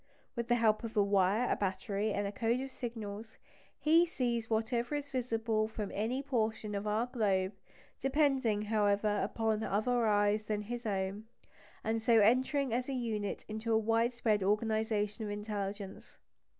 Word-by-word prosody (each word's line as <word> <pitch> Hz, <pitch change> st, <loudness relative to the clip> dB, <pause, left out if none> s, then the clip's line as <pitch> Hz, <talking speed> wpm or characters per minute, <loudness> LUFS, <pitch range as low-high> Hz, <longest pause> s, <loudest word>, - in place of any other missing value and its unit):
With 235 Hz, -1 st, -3 dB
the 240 Hz, -, +3 dB
help 220 Hz, -2 st, +2 dB
of 230 Hz, -1 st, -5 dB
a 205 Hz, -, +6 dB
wire, 200 Hz, +4 st, +2 dB
a -, -, +2 dB
battery, 200 Hz, +2 st, -1 dB
and 205 Hz, 0 st, -1 dB
a 200 Hz, -, -2 dB
code 235 Hz, +2 st, 0 dB
of 270 Hz, 0 st, -6 dB
signals, 220 Hz, -3 st, -6 dB, 0.4 s
he 325 Hz, +3 st, +5 dB
sees 240 Hz, -8 st, -1 dB
whatever 235 Hz, +4 st, 0 dB
is 285 Hz, -1 st, -4 dB
visible 225 Hz, -3 st, 0 dB
from 215 Hz, -2 st, -5 dB
any 240 Hz, +6 st, -1 dB
portion 220 Hz, -5 st, -1 dB
of 200 Hz, +1 st, -3 dB
our 215 Hz, +3 st, +1 dB
globe, 200 Hz, -6 st, 0 dB, 0.5 s
depending, 270 Hz, -6 st, +2 dB
however, 210 Hz, -1 st, +1 dB
upon 220 Hz, +1 st, 0 dB
other 225 Hz, +3 st, +1 dB
eyes 205 Hz, 0 st, +2 dB
than 210 Hz, -1 st, -2 dB
his 240 Hz, +2 st, -5 dB
own, 195 Hz, +1 st, -2 dB, 0.6 s
and 225 Hz, 0 st, 0 dB
so 230 Hz, +1 st, +4 dB
entering 255 Hz, +4 st, +3 dB
as 250 Hz, +3 st, -1 dB
a -, -, -1 dB
unit 220 Hz, -5 st, -3 dB
into 220 Hz, +1 st, -3 dB
a 220 Hz, -, +5 dB
widespread 225 Hz, -1 st, +1 dB
organisation 215 Hz, +1 st, 0 dB
of 210 Hz, -, -4 dB
intelligence. 205 Hz, -1 st, -5 dB
220 Hz, 160 wpm, -33 LUFS, 205-240 Hz, 0.6 s, a